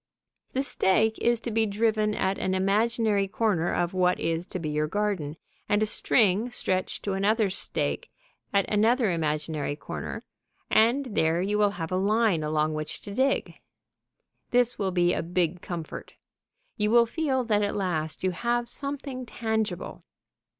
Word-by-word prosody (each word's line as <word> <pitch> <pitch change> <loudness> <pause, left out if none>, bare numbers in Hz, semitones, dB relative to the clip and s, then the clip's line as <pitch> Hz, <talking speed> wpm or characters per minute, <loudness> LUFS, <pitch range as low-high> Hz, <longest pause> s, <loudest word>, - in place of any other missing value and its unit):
"] - - -46
The 265 - +1
stake 220 -3 +2
is 235 -1 +2
to 235 - -4
be 220 0 +2
driven 215 0 +1
at 190 +1 0
an 190 0 0
imaginary 205 +1 +2
corner 195 -5 0
of 175 0 0
what 180 -1 +2
is 165 +2 -1
to - - -5
be 160 -3 -3
your 150 0 0
garden, 185 -5 -2 0.3
and 205 +1 +3
a - - +3
string 215 0 +3
stretched 185 -6 -2
to 200 - -1
another 205 +1 +2
stake - - -3 0.4
at 200 -1 +2
another 220 +1 +3
imaginary 155 -2 -1
corner, - - -6 0.5
and 250 +4 +3
there 160 -1 +2
you 205 +3 0
have 200 -6 0
a 185 - +1
line 205 -2 +2
along 155 0 0
which 155 0 -5
to 200 - -8
dig. 265 +5 0 0.9
This 245 -1 +2
will 195 -2 0
be 175 -1 +2
a - - -1
big 175 0 -1
comfort. 170 -3 -7 0.6
You 210 0 +1
will 235 +1 +6
feel 265 0 -1
that 210 -3 +1
at 205 -1 -1
last 160 -6 -2
you 185 - +2
have 240 +5 -1
something 275 -1 -5
tangible. 220 -7 -3
200 Hz, 160 wpm, -27 LUFS, 175-225 Hz, 0.9 s, will